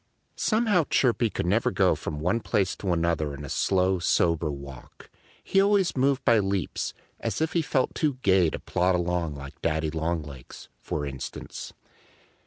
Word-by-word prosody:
Somehow 215 -7 +2
Chirpy 120 -3 +2
could - - -3
never 100 +6 +2
go - - +3
from 75 - -5
one 90 +9 +1
place 100 -4 0
to 95 - -2
another 85 -4 0
in 75 +1 -8
a - - -8
slow, 95 +2 +1
sober 85 -2 +2
walk. 70 -3 -10 0.3
He 195 - +3
always 200 -2 +3
moved 135 0 +1
by 115 -2 +5
leaps, 95 -4 -2 0.2
as - - -2
if 160 0 0
he 170 - +2
felt 135 -4 0
too 150 -4 0
gay 95 -4 +4
to - - -4
plod 90 +1 +1
along 85 -3 -1
like 70 0 -10
Daddy 80 -1 0
Longlegs, 80 -4 -5
for 75 - -3
instance. 70 -2 -7
90 Hz, 165 wpm, -26 LUFS, 80-120 Hz, 0.3 s, by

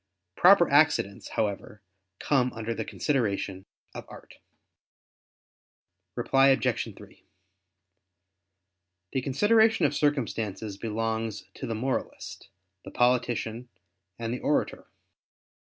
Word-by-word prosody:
Proper 180 -2 +6
accidents, 140 -9 +2
however, 105 -1 -4 0.4
come 125 -3 +1
under 115 0 -4
the - - -4
consideration 100 -8 -2 0.3
of - - -8
art. - - -13 1.8
Reply 135 0 +3
Obj. 135 -1 +1
3: - - -16 1.9
The 130 - 0
consideration 220 - +3
of 145 - +1
circumstances 115 -8 -2
belongs 110 0 -3
to - - -7
the 115 - -3
moralist, 130 +4 -4 0.3
the - - -9
politician, 120 -1 0 0.5
and 115 0 -3
the 125 - -4
orator. 150 - -1
120 Hz, 95 wpm, -27 LUFS, 110-140 Hz, 1.9 s, Proper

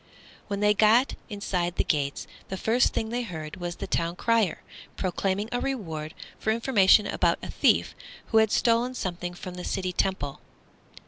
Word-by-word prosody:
When 200 -1 -3
they 210 0 +5
got 225 +5 +4 0.2
inside 180 -4 -2
the - - +1
gates 140 -3 -1 0.2
the 190 - -3
first 235 +6 +2
thing 220 - -2
they 240 +2 -1
heard 160 -9 -6
was 175 -1 -4
the - - -5
town 170 +1 -1
crier 225 -2 +1 0.3
proclaiming 195 +2 -1
a 245 - 0
reward 160 - -4 0.2
for - - -2
information 220 -3 +4
about - - +1
a - - -5
thief - - +2 0.4
who 225 - +5
had 220 -1 +4
stolen 240 +2 +2
something 175 -4 -4
from 180 0 -8
the 180 0 -7
city 185 -1 -2
temple. 175 -8 -1
195 Hz, 170 wpm, -27 LUFS, 175-225 Hz, 0.4 s, they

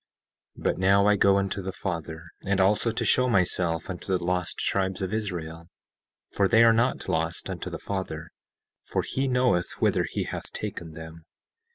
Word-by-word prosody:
17:4 - - -11
But - - +1
now 100 +1 +4
I 105 0 +5
go 100 0 +4
unto 100 +1 -1
the 95 0 -4
Father, 85 -3 -5 0.2
and 100 0 0
also 105 +4 +3
to 115 - -2
show 125 0 +3
myself 90 -5 +1
unto 90 -2 -6
the 90 - -7
lost 90 -1 -1
tribes 95 -1 0
of 95 +2 -3
Israel, 85 -6 -4 0.6
for 100 - +2
they 110 +4 +6
are 115 -1 +7
not 115 +3 +1
lost 80 +1 -1
unto - - -5
the - - -5
Father, 85 -5 -5 0.5
for - - -2
he 135 +1 -1
knoweth 125 -9 +2
whither - - +1
he - - -2
hath - - -6
taken 80 -2 -6
them. 80 0 -10
95 Hz, 180 wpm, -26 LUFS, 85-105 Hz, 0.6 s, are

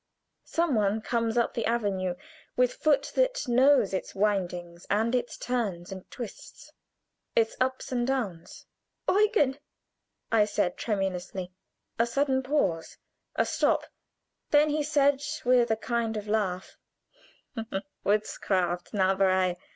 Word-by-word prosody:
Some 335 -3 +1
one 210 -1 +2
comes 230 0 0
up 235 - +2
the 230 - -1
avenue, 200 -6 0 0.4
with 250 0 +3
foot 300 -3 +1
that - - +1
knows 255 -3 +4
its 190 - -3
windings, 180 -4 -1
its 235 +4 0
turns 205 -9 -2
and 190 -1 -9
twists, 240 -4 -9 0.6
its 225 -1 +2
ups 260 0 -1
and 245 -1 0
downs. 210 -11 -3 0.4
"Eugen!" 390 - +3 0.7
I 220 -2 +5
said, 205 -3 0
tremulously. 190 -3 -3 0.5
A 230 - +3
sudden 265 +1 +1
pause 255 - -1 0.4
a - - +2
stop; - - +1 0.6
then 295 +1 +5
he 300 +1 0
said 285 -2 +2 0.2
with 245 -1 +4
a 220 - +3
kind 230 -1 -1
of 210 0 -5
laugh: 195 -4 -1 1.3
"Witchcraft 185 -4 0
Zauberei!" 190 -2 +2
225 Hz, 120 wpm, -28 LUFS, 190-260 Hz, 1.3 s, I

